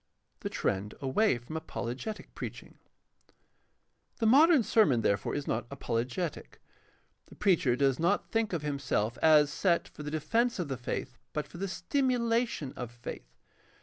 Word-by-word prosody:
The -, -, -4 dB
trend 100 Hz, +2 st, -2 dB
away 140 Hz, -, +2 dB
from 120 Hz, +7 st, -9 dB
apologetic 160 Hz, -, -5 dB
preaching. -, -, -8 dB, 0.7 s
— -, -, -46 dB
The 225 Hz, -, +1 dB
modern 285 Hz, +4 st, +6 dB
sermon, 155 Hz, -, +4 dB
therefore, 100 Hz, -2 st, 0 dB
is 145 Hz, -, -3 dB
not 120 Hz, +1 st, -2 dB
apologetic. 130 Hz, +5 st, -3 dB, 0.7 s
The -, -, -15 dB
preacher 170 Hz, -11 st, +3 dB
does 135 Hz, -1 st, +2 dB
not 170 Hz, +1 st, +1 dB
think 225 Hz, -1 st, +1 dB
of 165 Hz, -4 st, -2 dB
himself 135 Hz, -6 st, -1 dB
as 150 Hz, -2 st, +5 dB
set 175 Hz, -3 st, +1 dB
for -, -, -11 dB
the 150 Hz, -, -4 dB
defense 230 Hz, +11 st, +1 dB
of 175 Hz, -6 st, -3 dB
the 135 Hz, -, -2 dB
faith 125 Hz, +1 st, -5 dB
but 150 Hz, -1 st, -2 dB
for 170 Hz, -, -11 dB
the 195 Hz, -, -1 dB
stimulation 235 Hz, -, 0 dB
of 125 Hz, -2 st, -5 dB
faith. 120 Hz, -, -9 dB
150 Hz, 150 wpm, -30 LUFS, -, 0.7 s, modern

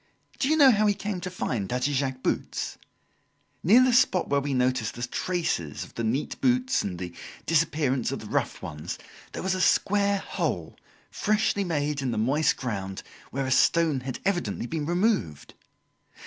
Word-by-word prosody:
Do 270 Hz, -, +1 dB
you 315 Hz, -, +3 dB
know 280 Hz, -4 st, +8 dB
how 215 Hz, -1 st, +3 dB
he 205 Hz, -, +3 dB
came 200 Hz, -3 st, -4 dB
to 180 Hz, -, -4 dB
find 120 Hz, -, -3 dB
Daddy 125 Hz, +4 st, 0 dB
Jacques's 130 Hz, -1 st, -1 dB
boots? -, -, -2 dB, 0.8 s
Near 230 Hz, +9 st, +6 dB
the 255 Hz, -1 st, +3 dB
spot 235 Hz, -7 st, +3 dB
where 140 Hz, -, +3 dB
we 140 Hz, 0 st, -3 dB
noticed 125 Hz, -3 st, 0 dB
the 120 Hz, -, -6 dB
traces 125 Hz, -, -2 dB
of -, -, -13 dB
the 115 Hz, -, -4 dB
neat 120 Hz, +6 st, -2 dB
boots 255 Hz, 0 st, +2 dB
and 90 Hz, -3 st, -4 dB
the 90 Hz, -1 st, -6 dB, 0.3 s
disappearance 150 Hz, -6 st, +1 dB
of -, -, -2 dB
the -, -, -9 dB
rough -, -, -2 dB
ones, 75 Hz, +3 st, -5 dB, 0.4 s
there -, -, -5 dB
was 190 Hz, 0 st, +1 dB
a 185 Hz, -, -1 dB
square 200 Hz, +2 st, +3 dB
hole, -, -, -3 dB, 0.4 s
freshly 210 Hz, -1 st, +1 dB
made 150 Hz, -4 st, -1 dB
in 135 Hz, -, -1 dB
the 115 Hz, -, -2 dB
moist 135 Hz, +8 st, +2 dB
ground, 95 Hz, -6 st, -4 dB, 0.3 s
where 135 Hz, +1 st, -2 dB
a 130 Hz, -, -2 dB
stone 160 Hz, +1 st, +3 dB
had 130 Hz, 0 st, -5 dB
evidently 150 Hz, -, -1 dB
been 150 Hz, +3 st, -3 dB
removed. 175 Hz, -, 0 dB
145 Hz, 175 wpm, -26 LUFS, 125-200 Hz, 0.8 s, know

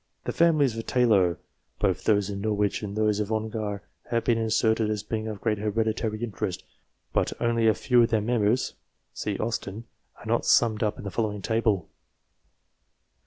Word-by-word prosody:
The -, -, -2 dB
families 155 Hz, -8 st, +3 dB
of 115 Hz, -, -6 dB
Taylor, 100 Hz, -8 st, +3 dB, 0.4 s
both -, -, 0 dB
those 105 Hz, -2 st, +2 dB
of 100 Hz, -, -4 dB
Norwich 105 Hz, -1 st, 0 dB
and 100 Hz, -1 st, -5 dB
those 105 Hz, -1 st, +2 dB
of 105 Hz, +1 st, -2 dB
Ongar, 110 Hz, -2 st, -3 dB, 0.3 s
have 115 Hz, -1 st, 0 dB
been 115 Hz, -2 st, +2 dB
inserted 110 Hz, 0 st, +2 dB
as 105 Hz, -1 st, -2 dB
being 110 Hz, +1 st, -3 dB
of 105 Hz, -2 st, -5 dB
great 105 Hz, -3 st, 0 dB
hereditary 110 Hz, +1 st, -1 dB
interest, 100 Hz, -5 st, -3 dB, 0.5 s
but -, -, +1 dB
only 115 Hz, -1 st, +2 dB
a 110 Hz, -, +4 dB
few 125 Hz, -2 st, +3 dB
of 115 Hz, -, +3 dB
their 110 Hz, -2 st, +2 dB
members 115 Hz, +2 st, +1 dB, 0.4 s
(see 105 Hz, -2 st, -3 dB
AUSTEN) 110 Hz, -1 st, -3 dB, 0.4 s
are -, -, +1 dB
summed 110 Hz, -3 st, +3 dB
up 105 Hz, -2 st, 0 dB
in -, -, -9 dB
the 100 Hz, -, -5 dB
following 105 Hz, -3 st, -2 dB
table. 110 Hz, -5 st, +1 dB
110 Hz, 165 wpm, -26 LUFS, 105-115 Hz, 0.5 s, a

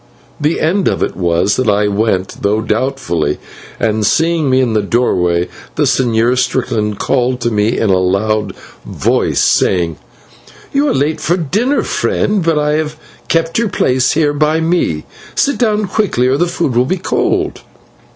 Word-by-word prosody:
The 150 Hz, +2 st, 0 dB
end 180 Hz, +4 st, +1 dB
of -, -, 0 dB
it -, -, -3 dB
was 90 Hz, +2 st, +1 dB
that 130 Hz, -4 st, +1 dB
I 105 Hz, 0 st, +2 dB
went, 100 Hz, -2 st, -1 dB
though 105 Hz, +2 st, +1 dB
doubtfully, 110 Hz, -, -1 dB, 0.4 s
and, 110 Hz, 0 st, 0 dB
seeing 160 Hz, +5 st, +1 dB
me 130 Hz, 0 st, +3 dB
in 125 Hz, -4 st, +1 dB
the 110 Hz, -, +2 dB
doorway 90 Hz, -6 st, +1 dB, 0.3 s
the -, -, +1 dB
Señor 120 Hz, 0 st, +2 dB
Strickland 115 Hz, -5 st, -1 dB
called 125 Hz, -1 st, 0 dB
to 120 Hz, -, 0 dB
me 105 Hz, +1 st, +1 dB
in 105 Hz, -, +1 dB
a 95 Hz, -, +3 dB
loud 105 Hz, +4 st, 0 dB, 0.3 s
voice, -, -, 0 dB
saying: 85 Hz, -4 st, +1 dB, 0.8 s
"You 285 Hz, +1 st, +2 dB
are -, -, +1 dB
late 150 Hz, +3 st, 0 dB
for 175 Hz, +3 st, +1 dB
dinner, 210 Hz, -, 0 dB
friend, 205 Hz, -3 st, 0 dB
but 165 Hz, -1 st, +1 dB
I 150 Hz, 0 st, +1 dB
have 155 Hz, 0 st, -5 dB, 0.3 s
kept 165 Hz, +3 st, 0 dB
your 230 Hz, -2 st, 0 dB
place 130 Hz, -7 st, +1 dB
here 150 Hz, -2 st, +1 dB
by 155 Hz, +2 st, +1 dB
me. 160 Hz, -, 0 dB, 0.3 s
Sit 280 Hz, -, +1 dB
down 215 Hz, -3 st, +1 dB
quickly 195 Hz, -, 0 dB
or 130 Hz, +2 st, +2 dB
the 175 Hz, -, +1 dB
food 170 Hz, -7 st, -2 dB
will 125 Hz, +1 st, +3 dB
be 185 Hz, +8 st, -1 dB
cold." 180 Hz, -, -1 dB
130 Hz, 170 wpm, -15 LUFS, 105-160 Hz, 0.8 s, me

